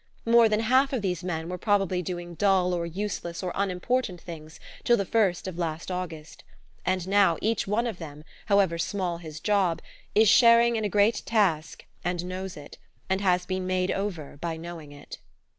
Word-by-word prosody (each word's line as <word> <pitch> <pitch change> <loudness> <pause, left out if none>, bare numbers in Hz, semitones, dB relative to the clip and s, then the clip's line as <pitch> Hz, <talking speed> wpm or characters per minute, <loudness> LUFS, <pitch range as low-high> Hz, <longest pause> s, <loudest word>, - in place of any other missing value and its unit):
More 230 -1 +6
than 215 +1 +1
half 260 +5 +3
of 240 -5 -1
these 180 -2 -2
men 165 -2 -3
were 180 +1 -5
probably 195 -3 +1
doing 175 0 -5
dull 185 0 +2
or 170 -1 -2
useless 175 -1 -4
or 180 - -2
unimportant 195 +1 -1
things 160 -2 -10 0.2
till 240 - +4
the 200 - -1
first 195 -5 +1
of 180 -2 -6
last 165 +1 -3
August; 165 -4 -6 0.6
now 190 -4 +3
each 225 -2 -1
one 215 +4 +1
of 225 -7 -4
them, 150 -2 -9 0.2
however 195 -5 +3
small 180 -2 -2
his 155 -2 -9
job, 195 -5 +1 0.4
is 220 +1 +6
sharing 235 +1 +6
in 220 - -1
a 210 - 0
great 205 +3 +3
task, 190 -9 0 0.2
and 175 0 -2
knows 185 0 -5
it, 145 -1 -12 0.3
and 190 +1 +1
has 180 -2 +2
been 185 0 -3
made 185 0 0
over 175 -8 -4
by 165 -1 -3
knowing 165 -3 -9
it. 145 0 -11
185 Hz, 180 wpm, -27 LUFS, 170-205 Hz, 0.6 s, More